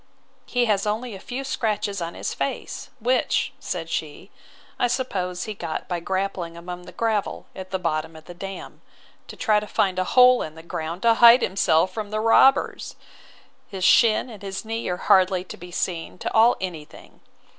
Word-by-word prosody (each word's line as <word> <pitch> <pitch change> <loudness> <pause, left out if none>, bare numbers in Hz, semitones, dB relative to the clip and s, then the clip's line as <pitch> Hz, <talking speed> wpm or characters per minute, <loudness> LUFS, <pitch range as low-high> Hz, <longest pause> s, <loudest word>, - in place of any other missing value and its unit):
He 245 -1 +1
has 210 -2 +1
only 220 +3 -2
a 195 - -8
few 255 +7 -5
scratches 210 -6 -2
on 170 0 -4
his - - -4
face; - - -4
which, 250 +3 +1
said - - -4
she, - - -5 0.5
I 245 - +3
suppose 190 -8 -2
he 215 - -5
got 160 -5 -5
by 175 -1 -2
grappling 185 -2 -3
among 180 +1 -8
the - - -9
gravel 220 -3 -2
at 185 0 -8
the 190 - -1
bottom 160 -2 -2
of 160 0 -13
the 175 - -10
dam, 195 +2 -8 0.5
to - - -9
try 215 -4 +2
to 210 - -8
find 190 -2 0
a - - +2
hole 250 0 +7
in 155 - -6
the 160 - -12
ground, 165 +1 -5
to 230 -1 +6
hide 235 +2 +7
himself 185 -1 +2
from 215 -2 -5
the 215 +1 -2
robbers. 230 +5 +3 0.7
His 190 -2 -6
shin 225 +5 +5
and 210 - -11
his 195 +1 -5
knee 225 +1 -3
are 180 - -2
hardly 185 0 +3
to 185 - -9
be 180 - -11
seen 175 -1 -3
to - - -4
ail 230 +2 +5
any 175 -5 -5
thing. - - -17
195 Hz, 190 wpm, -24 LUFS, 180-225 Hz, 0.7 s, hole